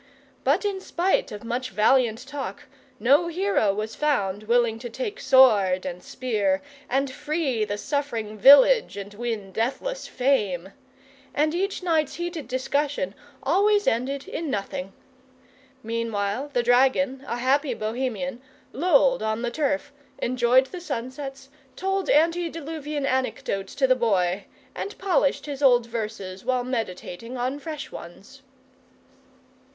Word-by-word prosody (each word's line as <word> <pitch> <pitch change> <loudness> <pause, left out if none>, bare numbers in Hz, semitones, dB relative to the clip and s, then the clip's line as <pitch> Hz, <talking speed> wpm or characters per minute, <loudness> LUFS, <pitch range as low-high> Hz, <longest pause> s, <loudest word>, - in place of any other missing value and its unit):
But 300 +10 +2
in 390 -2 -1
spite 370 +1 0
of 210 0 -7
much 250 +2 -3
valiant 235 +3 +2
talk 285 0 -6 0.4
no 280 +10 +4
hero 345 - +1
was 215 +2 -4
found 215 -9 0
willing 235 -1 +2
to 240 0 -6
take 430 - -5
sword 220 -9 +5
and 180 -1 -5
spear 205 -7 -1 0.3
and 270 +1 +1
free 290 -4 -1
the 205 0 -3
suffering 235 -5 -3
village 280 - +7
and 200 +1 -7
win 215 -3 -4
deathless 275 - -2
fame; 205 -9 0 0.6
and 305 +2 +2
each 385 +2 -2
night's 320 -5 +1
heated 345 -3 -4
discussion 260 -4 -1 0.3
always 405 +8 +3
ended 265 +4 -1
in 325 -2 -4
nothing. 195 -4 -3 0.9
Meanwhile 225 +2 -2
the 245 -3 +1
dragon, 265 +2 +3
a 235 - -2
happy 270 +3 +1
Bohemian, 250 +3 -3 0.3
lolled 275 -4 +3
on 220 +2 -1
the 240 - -1
turf, 290 +2 -1 0.2
enjoyed 250 +1 +3
the 355 +6 -8
sunsets, 270 -1 -6 0.3
told 385 0 -1
antediluvian 315 -2 0
anecdotes 250 -7 -2
to 275 - +3
the 255 0 +4
Boy, 195 -5 +1 0.3
and 400 - -6
polished 365 -7 +1
his 285 -2 -6
old 245 -4 +5
verses 215 -5 -5
while 255 0 0
meditating 230 -1 -4
on 255 +4 -2
fresh 305 -1 -6
ones. 200 +10 -11
260 Hz, 130 wpm, -25 LUFS, 220-290 Hz, 0.9 s, village